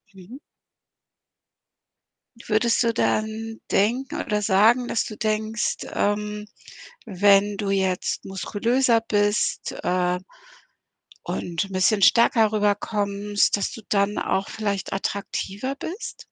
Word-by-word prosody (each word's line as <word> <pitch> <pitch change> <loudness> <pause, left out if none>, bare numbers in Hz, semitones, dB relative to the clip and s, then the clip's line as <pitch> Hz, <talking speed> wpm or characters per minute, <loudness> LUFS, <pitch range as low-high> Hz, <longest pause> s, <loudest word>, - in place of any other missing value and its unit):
Mhm. 200 +9 -12 2.1
Würdest 230 +2 +2
du 230 0 +1
dann 220 0 -1
denken, 255 +9 0
oder 210 -1 -1
sagen, 220 +5 +4
dass 230 - 0
du 215 - -8
denkst, 220 +1 -1 0.2
ähm, 210 0 -1 0.6
wenn 200 0 +3
du 200 -1 -3
jetzt 190 -2 -1
muskulöser 230 +6 +1
bist, 205 -2 0
äh, 180 0 +1 1.0
und 170 +2 -3
'n 195 - -13
bisschen 190 +2 +2
stärker 225 0 +5
rüberkommst, 205 -1 0
dass 200 - -2
du 225 - -9
dann 200 0 +1
auch 195 - -1
vielleicht 200 -3 -3
attraktiver 200 +5 -3
bist? 355 - -7
210 Hz, 105 wpm, -24 LUFS, 200-225 Hz, 2.1 s, stärker